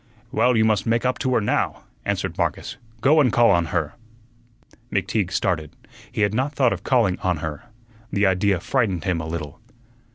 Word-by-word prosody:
"Well, 125 -2 +3
you 110 - +4
must 110 -1 +1
make 115 +2 +1
up 125 0 0
to 130 -1 0
her - - +3
now," 105 - -1 0.2
answered - - -2
Marcus. - - -2 0.2
"Go 150 +3 +5
and 125 -5 +3
call 120 -1 +5
on 85 -3 +3
her." 80 -3 -2 1.0
McTeague 100 0 0
started. 80 -5 -1 0.4
He - - -3
had 105 0 +2
not 130 +6 -1
thought 125 -4 +3
of - - -7
calling 115 -8 +2
on 90 -2 0
her. 80 +7 -6 0.5
The 100 0 +2
idea 95 0 +2
frightened 100 - 0
him 90 -3 -1
a 80 - -6
little. 80 -3 -6
100 Hz, 185 wpm, -23 LUFS, 85-120 Hz, 1.0 s, Go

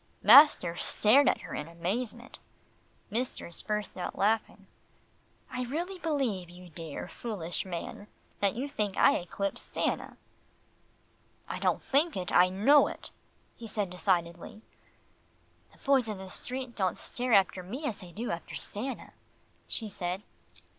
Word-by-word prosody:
Master 280 - +8
stared 250 +10 +4
at - - 0
her - - -8
in 150 - -4
amazement. 215 +9 -4 0.7
Mistress 225 -7 -3
burst 210 -3 -3
out 180 - -4
laughing. 215 +2 0 0.9
"I 250 0 -2
really 345 +9 -4
believe, 260 - -1
you 180 0 -13
dear, 160 -2 -7
foolish 195 -8 -4
man, 185 +3 -6 0.3
that 200 0 +1
you 260 +4 -2
think 210 -8 -2
I - - +6
eclipse 195 +3 -3
Stanna." - - -2 1.3
"I - - -4
don't - - +1
think 295 - +2
it, 180 -1 -3
I 180 +1 +6
know 225 +11 +5
it," - - -8 0.4
he 230 - -9
said 205 -3 -2
decidedly. 180 +2 -1 1.1
"The - - -22
boys 270 -4 +2
in 210 -2 -4
the 190 -1 -9
street 255 -1 -6
don't 185 -3 0
stare 245 -1 -1
after 190 -2 +4
me 245 - -6
as 230 -8 -3
they 180 -2 -11
do 230 +7 -4
after 170 -1 -5
Stanna," 255 +6 -5 0.5
she 225 - -2
said. 185 -1 -4
210 Hz, 140 wpm, -30 LUFS, 180-250 Hz, 1.3 s, Master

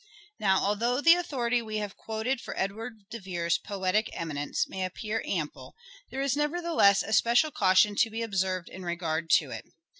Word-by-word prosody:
Now 190 -2 +3
although 230 +5 +1
the 330 +3 +7
authority 250 -9 0
we 215 -1 -4
have 205 -2 -4
quoted 225 +4 -3
for - - -7
Literary - - +1
Edward 215 +1 -7
de 230 - -5
Vere's 175 -3 -1
poetic 200 +1 -1
eminence 145 -3 -2
may 190 -1 -4
appear 215 +4 -3
ample 160 -6 -4 0.3
there 270 - -4
is 275 -1 +1
nevertheless 295 - +3
a 220 - -4
special 240 +8 +4
caution 200 -1 +4
to 225 - +3
be 225 +1 -4
observed 190 -4 -1
in 190 - -9
regard 170 -2 -2
to - - -4
it. - - -6
210 Hz, 180 wpm, -28 LUFS, 185-240 Hz, 0.3 s, the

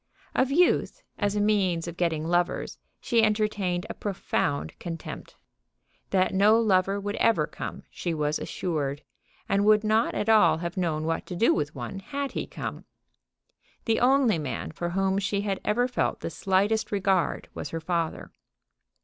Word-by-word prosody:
Of 260 - +2
youth, 345 +6 +2 0.2
as 205 -1 0
a - - +1
means 195 -5 +1
of 170 - -6
getting 165 -3 0
lovers, 175 +1 0 0.2
she 230 -1 +2
entertained 210 -4 0
a - - -5
profound 175 -7 -2
contempt. 165 -2 -7 0.7
That 185 -1 +2
no 210 +4 +5
lover 195 -2 +2
would 205 +1 -4
ever 230 -1 +3
come - - -7
she 175 - -3
was 150 -1 -1
assured, 145 -4 -3 0.4
and 200 +1 +2
would 215 0 +5
not 220 +2 +2
at 210 - -1
all 220 -6 +5
have 170 +1 -4
known 165 -4 -1
what 165 +1 -2
to 180 - -5
do 230 +7 +4
with 150 -1 -2
one 130 +10 -5
had 280 +6 -4
he - - -4
come. - - -6 1.0
The 225 -1 +2
only 250 -7 +4
man 145 -4 -4
for 170 +2 -4
whom 195 +2 +1
she 200 0 -1
had 200 -2 -2
ever 245 +4 +2
felt 250 - -1
the - - -4
slightest 195 +6 +1
regard 195 -3 +1
was - - -5
her 165 - -4
father. 165 0 -2
195 Hz, 165 wpm, -27 LUFS, 170-215 Hz, 1.0 s, no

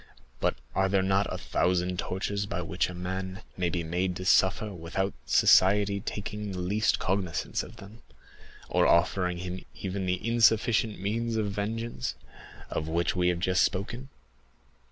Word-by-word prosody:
But - - +1 0.2
are 95 0 +2
there 95 -1 +2
not 95 +1 +1
a - - -2
thousand 90 0 0
tortures 100 +3 -2
by 90 -3 -3
which 90 +2 -1
a 90 - -7
man 95 +2 -4
may 90 -2 0
be 85 -1 -2
made 90 +3 -1
to 90 - -6
suffer 95 +3 +3
without 90 +3 -2
society 100 +1 +5
taking 105 0 -5
the - - -5
least 100 +5 +1
cognizance 95 -2 -1
of - - -10
them, 105 +4 -13 0.7
or - - +3
offering 90 +1 +2
him 90 +1 -5
even 95 0 -3
the 90 +4 -1
insufficient 115 -1 +3
means 115 +4 -1
of 105 -2 0
vengeance, 110 - -3 0.6
of 80 - -2
which 85 +2 0
we 90 -1 +2
have 90 -1 +2
just 90 +1 +2
spoken? 120 +8 -1
95 Hz, 155 wpm, -28 LUFS, 90-105 Hz, 0.7 s, society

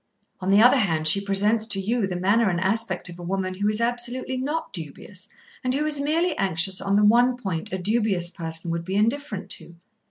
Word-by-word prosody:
On 185 - -3
the 200 +3 +5
other 250 +3 +6
hand, 160 -7 0
she 200 +6 +5
presents 205 +3 +2
to 205 -3 +1
you 215 +2 -1
the 185 - -4
manner 200 +5 +2
and 175 -2 -1
aspect 190 0 -1
of 175 0 -10
a - - -8
woman 185 +1 -3
who 200 +3 -1
is 215 +1 0
absolutely 240 +2 -1
not 295 +5 -3
dubious, 180 +3 -9 0.4
and 255 0 0
who 295 +2 0
is 300 -2 +1
merely 325 +3 0
anxious 190 0 +1
on 195 0 0
the 210 +1 +4
one 245 +3 +4
point 190 -9 -5
a 190 - -2
dubious 195 -3 0
person 165 0 -5
would 170 0 -3
be 190 +3 -4
indifferent 225 +1 -1
to. 170 - -3
200 Hz, 215 wpm, -24 LUFS, 185-240 Hz, 0.4 s, other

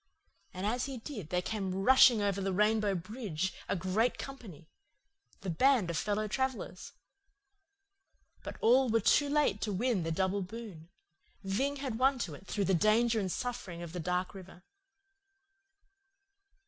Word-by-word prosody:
And 185 +2 -5
as 240 +4 0
he 270 -2 -5
did 220 - -8
there 180 +1 0
came 195 -3 -3
rushing 230 +2 +6
over 200 -1 0
the 195 0 -1
Rainbow 210 +1 +2
Bridge 190 -2 -4 0.2
a - - +1
great 190 +7 0
company 220 - -9 0.7
the 195 - -4
band 230 0 +3
of - - -4
fellow 210 +4 -1
travellers. 255 -5 -3 1.5
But - - -7
all 255 +2 +4
were 225 +1 +3
too 285 +7 +3
late 285 -9 +1
to 210 - -1
win 215 +1 0
the 165 0 -2
double 190 +4 0
boon. 190 -5 -9 0.5
Ving 260 +9 -1
had 265 -5 -4
won 265 +1 +3
to 175 -10 -4
it 185 +7 -12
through 205 -2 -1
the 190 - +1
danger 220 +5 +3
and 190 -3 -2
suffering 205 -9 -5
of 170 -1 -8
the 180 - -4
dark 180 +3 -2
river." 185 -2 -12
205 Hz, 155 wpm, -31 LUFS, 185-240 Hz, 1.5 s, rushing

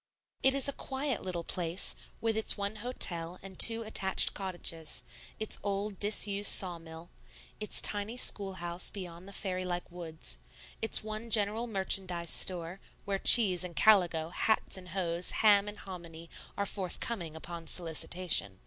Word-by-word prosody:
It 265 0 +6
is 275 - +2
a 280 - -2
quiet 265 -2 -4
little 180 -2 -4
place, 170 +1 -2 0.3
with 225 -1 0
its 220 - +7
one 200 +1 -3
hotel 180 -7 -4
and 190 -2 -10
two 230 0 +5
attached 195 -3 +2
cottages, 175 -5 -4 0.4
its 220 - +2
old, 200 0 -3
disused 205 -1 +2
saw 180 -3 0
mill, 165 +1 -12 0.5
its 210 - 0
tiny 210 +3 0
schoolhouse 185 -6 +1
beyond 180 -2 -9
the - - -10
fairy 185 -2 -3
like 175 -1 -5
woods, 165 -2 -9 0.4
its 225 - +1
one 215 +2 -6
general 220 +1 +2
merchandise 190 -4 -1
store, 180 0 0 0.3
where 195 -1 -2
cheese 190 -7 +7
and 175 -2 -8
calico, 175 -7 +3
hats 220 +5 -1
and 185 -1 -8
hoes, 175 -1 -2 0.2
ham 205 -1 +5
and 210 0 -6
hominy, 170 -3 -10 0.3
are 200 - -1
forthcoming 185 -3 -4
upon 165 0 -8
solicitation. 165 - 0
190 Hz, 150 wpm, -31 LUFS, 170-210 Hz, 0.5 s, its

